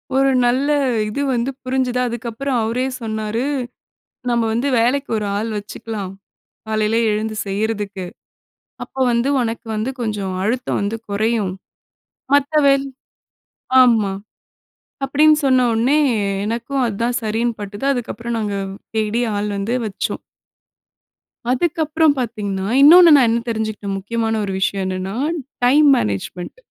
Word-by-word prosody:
ஒரு 270 0 +4
நல்ல 260 +4 +2 0.4
இது 280 +7 -3
வந்து 240 +2 0
புரிஞ்சது. 255 -1 0
அதுக்கு 235 0 -5
அப்புறம் 265 +2 -2
அவரே 240 +4 -1 0.2
சொன்னாரு. 220 0 -3 0.9
நம்ம 235 -1 +2
வந்து 240 +5 0
வேலைக்கு 270 +4 +1
ஒரு 210 - -2
ஆள் 225 +2 -2
வெச்சுக்கலாம். 205 -1 -6 0.6
காலைல 215 +1 +1
எழுந்து 215 +1 -2
செய்றதுக்கு. 205 -1 -2 0.8
அப்ப - - -25 0.2
வந்து 235 +3 +1
உனக்கு 230 0 -3
வந்து 220 +5 -1
கொஞ்சம் 205 -5 -2
அழுத்தம் 245 +5 -1
வந்து 205 +3 -2
குறையும். 215 -1 0 0.8
மத்த 285 +1 +2
வே 275 - +6 1.1
ஆமா. 220 -5 +3 0.9
அப்டின்னு 300 +3 +4
சொன்ன 255 -2 +4
உடனே 250 +7 +2 0.5
எனக்கும் 245 +4 -2
அதுதான் 235 +3 -1
சரின்னு 225 +2 -1
பட்டது. 205 +5 -6
அதுக்கப்புறம் 235 -1 -4
நாங்க 205 -2 -2 0.4
தேடி 220 +2 0 0.2
ஆள் 205 +1 -1
வந்து 210 +5 -2
வச்சோம். 205 -2 -3 1.3
அதுக்கப்புறம் 315 +2 +2
பாத்தீங்கன்னா, 205 -5 -3
இன்னொன்னு 335 +3 +9
நான் 265 -4 +5
என்ன 230 - +1
தெரிஞ்சுக்கிட்டேன், 215 -3 -3
முக்கியமான 225 +3 -2
ஒரு 195 - -4
விஷயம் 190 0 0
என்னன்னா, 185 +2 -3 0.5
டைம் 290 +4 +5
மேனேஜ்மென்ட். 105 - -3
225 Hz, 120 wpm, -19 LUFS, 210-255 Hz, 1.3 s, இன்னொன்னு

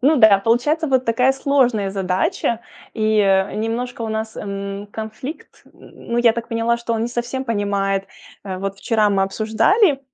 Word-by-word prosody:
Ну 290 +5 +4
да, 220 -6 +7
получается 245 +10 +1
вот 260 -3 +2
такая 250 +3 +3
сложная 260 -7 +1
задача, 190 +4 -1 0.3
и, 215 -1 +1
э, 195 -1 +3
немножко 230 +3 -3
у 225 - -3
нас, 220 0 -4
м, 200 0 -5
конфликт. 220 +7 -8
Н - - -23
н - - -11
ну, 235 - +2
я 240 -1 +5
так 230 0 -5
поняла, 230 0 +1
что 235 0 -4
он 225 - -1
не 235 - -1
совсем 245 +2 -3
понимает. 200 -3 -1 0.4
Вот 195 0 -4
вчера 215 -1 +2
мы 195 -1 +2
обсуждали, 265 - +2
225 Hz, 170 wpm, -20 LUFS, 200-245 Hz, 0.4 s, да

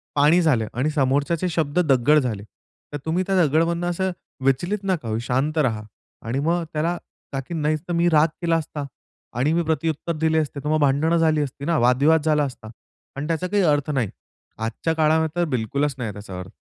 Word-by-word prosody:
पाणी 150 +5 +5
झाले 135 -10 +2
आणि 130 +6 0
समोरच्याचे 145 +4 +1
शब्द 160 -1 0
दगड 135 +4 +5
झाले. 110 -7 -3 0.5
तर - - -2
तुम्ही 170 +3 0
त्या 195 - +1
दगडमधून 165 +4 +1
असं 190 +2 -1 0.3
विचलित 175 +10 +1
नका 185 -10 -1
होऊ. 110 0 -1
शांत 130 +6 -1
राहा 115 -8 +1 0.4
आणि 125 +4 -1
मग 170 +4 +1
त्याला 165 +3 0 0.4
ताकी 135 +5 -4
मी 160 - -2
नाही 150 +1 +2
तर 175 - -2
मी 170 +1 +2
राग 155 -1 +5
केला 170 -1 +2
असता 150 -2 -5 0.5
आणि 145 +5 +2
मी 170 +1 +1
प्रत्युत्तर 160 +1 -1
दिले 160 0 +1
असते, 150 -2 -3
तर 150 - -2
मग 155 0 +2
भांडणं 145 +4 +2
झाली 160 -2 +3
असती 140 0 -5
ना, 170 0 +1
वादविवाद 140 +7 +4
झाला 150 -1 +3
असता 125 -5 -6 0.5
आणि 140 +2 -4
त्याचा 165 +2 -1
काही 200 +1 +1
अर्थ 145 -3 +2
नाही. 130 -8 0 0.5
आजच्या 115 +9 -2
काळामध्ये 160 +1 +2
तर - - +2
बिलकुलच 135 +4 -1
नाही 115 -5 -4
त्याचा 95 -2 -8
अर्थ. 90 +1 -9
150 Hz, 195 wpm, -23 LUFS, 135-165 Hz, 0.5 s, पाणी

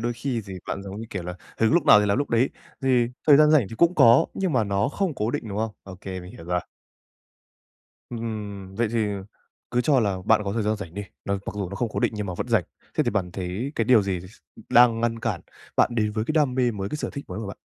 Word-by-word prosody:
đôi 120 +1 -1
khi 120 0 -3
gì 100 -1 -8
bạn 100 - -4
giống 100 +2 -7
như 115 - -6
kiểu 95 - -4
là 90 +1 -5 0.2
hứng 110 +3 +3
lúc 165 -2 +3
nào 105 - +8
thì 105 - +1
làm 100 - +2
lúc 145 - -2
đấy, 115 +3 +3 0.3
thì 125 -3 +3 0.2
thời 145 -2 +8
gian 150 +1 +6
rảnh 150 -8 +5
thì - - -8
cũng 170 +5 +4
có 120 -6 +6
nhưng 190 -4 -1
mà 115 -4 +2
nó 100 0 0
không 180 +2 -2
cố 110 -2 -1
định, 115 - -4
đúng 100 0 -4
không? 110 0 -1
Ô 95 -2 -10
kê, 95 -1 -6
mình 90 +2 -11
hiểu 80 - -11
rồi. 90 +1 0 1.5
Ừm, 105 -5 -5
vậy 115 +1 0
thì 115 -2 +1 0.6
cứ 125 - +1
cho 135 +1 +3
là 100 -4 0
bạn 110 0 +4
có 100 - -2
thời 115 -1 -1
gian 105 +1 0
rảnh 95 -5 -8
đi, 100 - -4 0.2
nó 100 - 0
mặc - - -3
dù 100 -3 -3
nó 100 - -7
không 120 +3 -1
cố - - -2
định - - +1
nhưng 105 -1 -3
mà 90 - -4
vẫn 120 - -4
rảnh. 110 -7 +3 0.3
Thế - - +2
thì - - +1
bạn 95 -3 -1
thấy 95 +10 -4
cái 115 - +1
điều 115 -3 +5
gì 95 -2 -2
s 95 +4 -14 0.3
đang 120 -1 +5
ngăn 115 -1 0
cản 105 -8 -2 0.4
bạn - - +4
đến 105 -2 0
với 110 0 -1
cái 155 - -2
đam 150 -5 +2
mê 125 -2 +2
mới, 100 -3 -4
cái 150 - -3
sở - - -4
thích 140 - -7
mới 90 - -5
của 110 - -5
bạn? 100 - -7
110 Hz, 280 wpm, -25 LUFS, 100-125 Hz, 1.5 s, nào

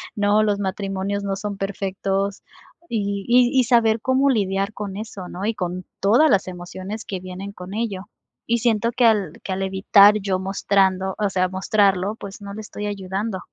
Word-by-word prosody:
¿no? 205 +1 +3
Los 205 -1 +1
matrimonios 195 0 -2
no 195 -1 -1
son 205 0 -5
perfectos 195 0 -2 0.5
y 200 -2 -1
y 245 0 +5
y - - +5
saber 230 -2 +3
cómo 265 +2 +2
lidiar 200 -3 0
con 200 -2 -6
eso, 205 -4 -7
¿no? 185 +3 -5
Y 225 +1 0
con 180 -2 -4 0.2
todas 240 +11 +5
las 195 -1 +2
emociones 185 +4 -7
que 190 - -4
vienen 185 +2 -7
con 180 0 -9
ello. 210 -4 -3 0.4
Y 235 - +2
siento 230 0 +1
que 240 +1 +2
al 205 -8 +3
que 190 - -3
al 190 - -3
evitar 200 +2 +5
yo 190 -2 -1
mostrando, 190 0 +1
o 205 -1 +1
sea, 185 -1 +1
mostrarlo, 195 +1 +1
pues 200 -2 -9
no 200 0 -7
le 215 - -7
estoy 210 -1 -6
ayudando. 195 +1 -3
200 Hz, 180 wpm, -22 LUFS, 190-215 Hz, 0.5 s, y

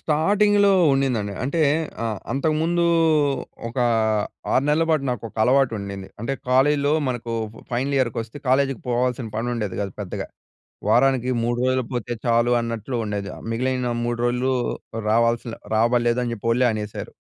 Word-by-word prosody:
స్టార్టింగ్‌లో 200 +6 +3 0.2
ఉండిందండి. 120 -7 0
అంటే 150 +5 -1 0.4
ఆహ్, 110 -3 -2
అంతకుముందు 160 +4 +1 0.8
ఒక 115 - -11 0.8
6 130 - +3
నెల్ల 155 +2 +3
పాటు 150 -3 +2
నాకొక 115 -2 -5
అలవాటు 130 0 +3
ఉండింది. 100 -1 -6
అంటే 115 +5 -2 0.2
కాలేజ్‌లో 145 +3 +3 0.2
మనకు 120 -2 -3 0.4
ఫైనల్ 135 +3 0
ఇయర్‌కొస్తే 115 0 -2
కాలేజీకి 135 -1 +2
పోవాల్సిన 125 -1 0
పని 120 +2 -2
ఉండేది 105 -5 -3
గాదు 100 -2 -4
పెద్దగా. 100 -3 -4 0.6
వారానికి 130 -2 +3
3 120 +1 0
రోజులు 130 0 +1
పోతే 120 0 -2
చాలు 120 0 +3
అన్నట్లు 115 +2 -4
ఉండేది. 100 -2 -3 0.2
మిగిలిన 125 +1 -1 0.2
3 120 0 -2
రోజులు 125 +2 +1 0.6
రావాల్సిన 115 +1 +1 0.2
రాబల్లేదు 120 +1 +2
అని 120 - -2
జెప్పి 115 0 -5
వోళ్ళే 125 +2 +3
అనేశారు. 105 -1 -5
125 Hz, 135 wpm, -23 LUFS, 115-135 Hz, 0.8 s, స్టార్టింగ్‌లో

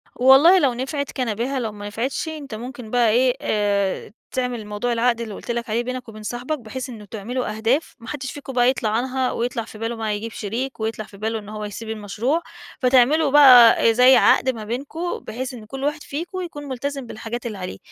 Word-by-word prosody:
والله 270 +9 +7
لو 265 -6 +2
نفعِت 270 +3 -3
كان 240 -6 -2
بها، 260 +4 -2
لو 225 -3 -3
ما 205 0 -8
نفعِتش 245 +9 -3
أنت 290 -7 -6
مُمكن 245 0 -8
بقى 240 -2 +3
إيه 250 +3 +3
آآ 205 -2 0 0.2
تعمل 250 -4 -2
موضوع 210 +4 -2
العقد 235 0 +1
اللي 220 -3 -5
قُلت 235 - -6
لَك 235 0 -3
عليه 235 +2 0
بينك 255 -1 -5
وبين 215 -1 -10
صاحِبك، 250 +6 -3
بحيث 255 +3 -6
إنه 215 -4 -9
تعملوا 220 +2 -4
أهداف 240 +8 0
ما 230 - -13
حدّش 265 -3 -5
فيكم 275 -2 -8
بقى 245 0 +4
يطلع 250 -4 0
عنها 255 +3 0
ويطلع 235 -1 -2
في 215 - -12
باله 225 +2 -3
بقى، 220 -2 -2
يجيب 220 +2 -5
شريك، 235 +7 -4
ويطلع 220 -1 -3
في 200 - -15
باله 220 +1 -2
إن 205 0 -12
هو 215 0 -5
يسيب 220 +2 -7
المشروع، 220 +9 -1 0.4
فتعمِلوا 265 +4 +4
بقى 250 -6 +8
أ - - +6
زي 250 +3 +6
عقد 260 - +4
ما 225 -4 -3
بينكم 285 +10 -4
بحيث، 255 +4 -6
إن 225 -3 -9
كل 270 +5 -7
واحد 295 +1 -1
فيكم 345 +6 -5
يكون 295 -5 -7
ملتزم 275 0 -4
بالحاجات 235 +2 -6
اللي 215 -3 -4
عليه، 180 - -6
245 Hz, 210 wpm, -22 LUFS, 220-265 Hz, 0.4 s, بقى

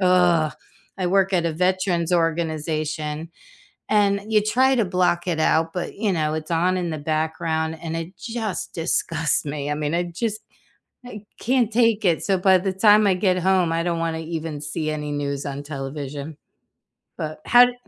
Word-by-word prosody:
I 180 -4 +3 0.5
work 195 +1 +2
at 175 -2 +2
a 165 - -1
veterans 180 0 0
organization, 160 -2 -1 0.6
and 200 -1 +3
you 215 -1 +5
try 260 +5 +3
to 230 -4 +2
block 180 -1 +1
it 170 -3 0
out, 160 +1 +2
but, 180 -1 -4
you 210 -1 0
know, 155 -2 0
it's 155 +1 -5
on 180 +3 +2
in 175 -2 -2
the 155 - -3
background, 160 +1 -1
and 165 -1 -4
it 165 +3 -7
just 225 -4 -4
disgusts 165 -1 0
me. 145 0 -3
I - - 0
mean, 150 0 -2
I 175 - +1
just 210 +5 -3 0.6
I 215 -4 -8 0.2
can't 245 -2 +1
take 230 -1 +3
it. 170 -4 +2
So, 195 -2 +1
by 190 +1 +5
the 190 +1 -2
time 210 +2 +5
I 195 - +4
get 185 -1 +1
home, 185 -2 +2
I 165 0 0
don't 170 -1 -1
wanna 165 -1 -2
even 160 -2 -5
see 155 +2 -3
any 150 -1 -4
news 140 -1 -3
on 140 0 -5
television, 140 +1 -6 0.8
but, 155 0 -4
how 245 +1 +8
d 250 - -3
170 Hz, 180 wpm, -23 LUFS, 155-190 Hz, 0.8 s, how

